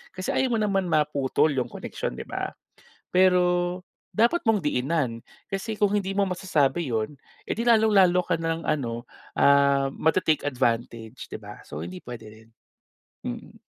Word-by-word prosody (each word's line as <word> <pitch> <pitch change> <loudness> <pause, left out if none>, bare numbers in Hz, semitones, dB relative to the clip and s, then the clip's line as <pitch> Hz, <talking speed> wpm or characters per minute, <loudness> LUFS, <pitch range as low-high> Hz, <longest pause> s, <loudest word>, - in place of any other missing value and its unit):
Kasi 185 0 -2
ayaw 255 -3 +1
mo 220 - +1
naman 195 -3 +1
maputol 150 -2 +2
'yung 125 -3 -1
koneksyon, 60 - -5
di - - -6
ba? - - -5 0.6
Pero 180 -1 +3 0.3
dapat 235 +11 +2
mong 225 -2 +3
diinan, 135 - -1 0.2
kasi 205 +2 -4
kung 205 -1 +2
hindi 195 -1 -1
mo 200 - +3
masasabi 170 -5 0
’yon, 110 +4 -1 0.3
eh, - - -1
di 230 - -2
lalong-lalo 205 -6 +4
ka - - +1
na 165 0 0
lang 165 - -9
ano, 120 -5 -2 0.3
ah, 140 -1 +5
ma-te-take 160 -1 +2
advantage, 120 -2 -2
di - - -5
ba? - - -11
So 75 - -8
hindi 90 +1 -9
puwede 120 -2 -9
rin, 110 +1 -15 0.8
mm. - - -6
160 Hz, 160 wpm, -26 LUFS, 125-195 Hz, 0.8 s, ah